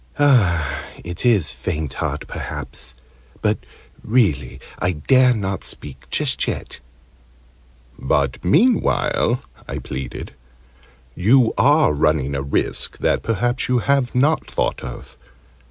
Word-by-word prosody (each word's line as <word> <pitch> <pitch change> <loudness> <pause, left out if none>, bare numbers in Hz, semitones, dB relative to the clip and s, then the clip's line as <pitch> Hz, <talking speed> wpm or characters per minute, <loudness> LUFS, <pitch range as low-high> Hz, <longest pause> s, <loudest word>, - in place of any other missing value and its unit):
"It 90 - +1
is 100 -11 +4
'faint 75 +3 -4
heart,' - - -3
perhaps. 65 -1 -6 0.5
But - - +2 0.4
really 105 - +1 0.2
I 90 - +1
dare 125 - +4
not 100 -2 -3
speak 75 - -8
just - - 0
yet." - - -4 1.2
"But 70 -2 0
meanwhile," 210 - +2 0.2
I - - -4
pleaded, 65 -2 -6 0.8
"you 115 - +4
are 145 - +4
running 75 -2 +1
a 70 - -1
risk 70 +1 -1
that - - +1
perhaps 120 +3 -1
you 125 - +3
have 135 0 +1
not 145 +5 +2
thought - - -1
of. 65 0 -9
95 Hz, 110 wpm, -21 LUFS, -, 1.2 s, is